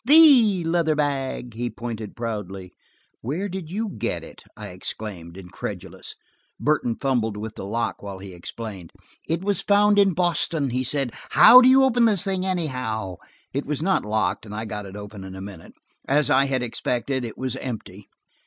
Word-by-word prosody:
"The 255 - +7
leather 165 -1 +1
bag!" 135 -4 -2
he 120 +2 -3
pointed 115 -3 -6
proudly. 100 -6 -5 0.5
"Where 155 - -2
did 185 -4 -6
you 215 +5 -2
get 195 - -3
it?" - - -12 0.2
I - - -7
exclaimed, 90 -5 -7
incredulous. 90 -2 -8 0.4
Burton 145 -6 +1
fumbled 120 -6 0
with 110 +1 -6
the 95 - -7
lock 115 +3 -2
while 100 -2 -7
he 95 0 -10
explained. 95 0 -8 0.4
"It 165 +2 -1
was 200 -2 0
found 205 0 +4
in 195 -4 +4
Boston," 165 -5 +1
he 130 +1 0
said. 130 -1 -1 0.2
"How 250 +2 +9
do 255 - +6
you 265 +1 +6
open 245 -2 +4
the 215 -3 +3
thing, 190 -1 0
anyhow?" 125 - -2 0.4
It 140 +2 -3
was 150 +1 -2
not 190 +2 +2
locked, 105 -2 -1
and 105 -1 -8
I 110 +1 -4
got 105 -2 -5
it 95 - -10
open 105 -1 -9
in 95 0 -8
a - - -8
minute. 95 -4 -10 0.3
As 145 0 +2
I 135 +1 +5
had 130 -2 -1
expected, 125 +2 -2
it 115 -2 -6
was 130 -2 -3
empty. 105 -5 -7
125 Hz, 180 wpm, -24 LUFS, 105-175 Hz, 0.5 s, How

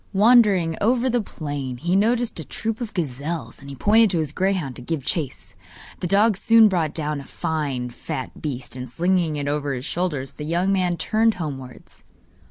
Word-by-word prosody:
Wandering 200 -6 +5
over 245 +3 +2
the 240 0 +2
plain, 145 -9 -5
he 175 +7 0
noticed 230 +1 +1
a - - -4
troop 225 - -4
of 230 - -4
gazelles, 145 -4 -4
and 140 -1 -10
pointed 220 +1 +5
to 175 - 0
his 155 -3 0
greyhound 185 -7 -1
to - - -9
give 140 +1 -3
chase. 150 -4 -3 0.5
The 180 - -2
dog 205 +2 +3
soon 225 +1 +6
brought 165 -6 0
down 150 -2 -2
a - - -10
fine 135 -6 -3
fat 130 +2 -6
beast, 130 -4 -4
and 125 -1 -6
slinging 170 +2 +1
it 145 -1 -3
over 145 -1 -1
his 125 +1 -5
shoulders, 150 -7 -2
the 150 - -8
young 175 +5 +1
man 180 -2 +1
turned 225 +3 +2
homewards. 135 -7 -7
165 Hz, 180 wpm, -23 LUFS, 140-200 Hz, 0.5 s, soon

